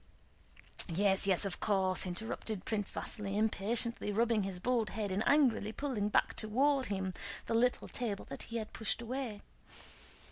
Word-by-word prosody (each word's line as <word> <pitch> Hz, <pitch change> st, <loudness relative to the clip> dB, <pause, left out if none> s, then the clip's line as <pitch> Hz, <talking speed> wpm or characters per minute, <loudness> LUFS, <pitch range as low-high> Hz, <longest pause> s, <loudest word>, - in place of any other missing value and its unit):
"Yes, 195 Hz, +3 st, +2 dB
yes, 190 Hz, 0 st, +5 dB
of 195 Hz, -, -3 dB
course," 190 Hz, -3 st, +1 dB
interrupted 210 Hz, +1 st, -4 dB
Prince 210 Hz, -3 st, -1 dB
Vasíli 200 Hz, -3 st, -3 dB
impatiently, 220 Hz, +1 st, +1 dB
rubbing 225 Hz, +1 st, +2 dB
his 195 Hz, -2 st, -3 dB
bald 230 Hz, +2 st, +1 dB
head 205 Hz, -1 st, -3 dB
and 190 Hz, +3 st, 0 dB
angrily 265 Hz, -7 st, +4 dB
pulling 225 Hz, -5 st, -1 dB
back -, -, +2 dB
toward 265 Hz, +5 st, +2 dB
him 190 Hz, -2 st, -2 dB, 0.3 s
the -, -, -2 dB
little 245 Hz, +2 st, +2 dB
table 215 Hz, -5 st, -3 dB
that -, -, -7 dB
he 230 Hz, -, -2 dB
had 220 Hz, -1 st, -5 dB
pushed 220 Hz, -, -1 dB
away. 235 Hz, -3 st, -4 dB
215 Hz, 150 wpm, -34 LUFS, 195-235 Hz, 0.3 s, yes